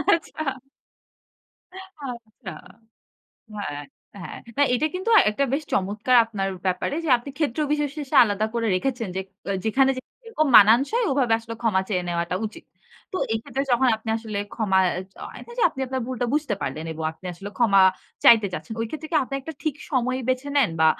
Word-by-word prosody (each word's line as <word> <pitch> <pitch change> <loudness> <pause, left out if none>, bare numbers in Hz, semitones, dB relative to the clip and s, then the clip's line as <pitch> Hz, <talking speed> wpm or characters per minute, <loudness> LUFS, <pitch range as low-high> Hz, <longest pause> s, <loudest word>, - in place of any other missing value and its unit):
আচ্ছা। 310 -3 -4 1.2
আচ্ছা। 275 - -9 1.1
হ্যাঁ, 145 -8 -5 0.4
হ্যাঁ। - - -7 0.2
হ্যাঁ, 285 -1 +4
এটা 295 +5 +1
কিন্তু 375 +5 -2 0.2
একটা 280 +7 0
বেশ 300 +3 0
চমৎকার 210 +6 +2
আপনার 200 -4 -3 0.2
ব্যাপারে 185 +9 -1
যে, - - -2
আপনি 245 +4 -9
ক্ষেত্র 300 -2 -1
বিশেষে 295 -1 -3
আলাদা 205 0 -1
করে 230 -1 0
রেখেছেন। 235 +1 -1
যেক 190 0 -3 0.2
অ - - -1
যেখানে 265 +5 +3
যেরকম 450 - -3
মানানসই, 265 - +4
ওভাবে 255 -4 +1
আসলে 230 0 -8
ক্ষমা 200 -5 +2
চেয়ে 180 -4 0
নেওয়াটা 170 +1 -1
উচিত। 215 - -11 0.5
তো 370 - 0
এই 225 - +1
ক্ষেত্রে 270 +3 -3
যখন 255 +1 +4
আপনি 220 +1 -11
আসলে 215 -3 -5 0.2
ক্ষমা 200 -4 +2
অ্যা 180 - +1 0.2
য - - -43
হয় - - -11
না - - -14
যে, - - +2
আপনি 265 - -9
আপনার 260 0 -3
ভুলটা 250 -1 -2
বুঝতে 290 -8 0
পারলেন 155 +4 -4
এবং 160 0 -6
আপনি 170 +3 -12
আসলে 200 +4 -8
ক্ষমা 200 -5 +5 0.4
চাইতে 220 -3 +7
চাচ্ছেন। 220 +4 -6
ওই 230 - -1
ক্ষেত্রে 310 0 -6
কি 320 - +2
আপনি 275 - -6
একটা 320 +4 -7
ঠিক 310 -4 -1 0.2
সময় 255 -1 0
বেছে 255 +2 0
নেন? 255 -11 +4
বা 160 - +6
240 Hz, 180 wpm, -24 LUFS, 205-280 Hz, 1.2 s, চাইতে